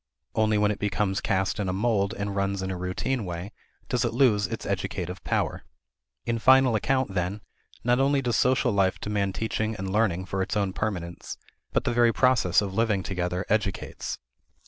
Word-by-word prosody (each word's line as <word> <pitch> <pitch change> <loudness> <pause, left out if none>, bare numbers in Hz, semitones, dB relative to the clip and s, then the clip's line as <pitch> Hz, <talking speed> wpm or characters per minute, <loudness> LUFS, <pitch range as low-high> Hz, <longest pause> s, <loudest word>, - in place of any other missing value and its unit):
Only 110 -1 +2
when 105 0 +3
it 105 - -4
becomes 105 -1 0
cast 95 0 0
in 100 -2 -1
a - - -1
mold 100 -1 +1
and 100 0 -3
runs 100 -1 -1
in 95 - -2
a - - -3
routine 90 +8 -2
way 90 +2 -5 0.4
does 125 - 0
it 115 -1 -1
lose 115 -6 +4
its 115 - -5
educative 90 -2 -3
power. - - -1 0.6
In 115 -1 -1
final 130 0 +6
account, 130 +1 0
then, 95 +3 -2 0.4
not 120 +1 +3
only 140 +1 +3
does 120 -3 0
social 125 +3 +3
life 95 -2 +1
demand 100 -2 -1
teaching 110 0 -1
and 95 -1 -4
learning 95 -4 +1
for 95 0 -2
its 95 +3 -1
own 100 -2 0
permanence, 85 -6 -4 0.3
but - - +1
the - - 0
very 120 -1 +4
process 120 -9 +3
of 95 -2 -4
living 105 -3 +1
together 90 0 -2
educates. 100 -2 -2
105 Hz, 185 wpm, -26 LUFS, 95-115 Hz, 0.6 s, final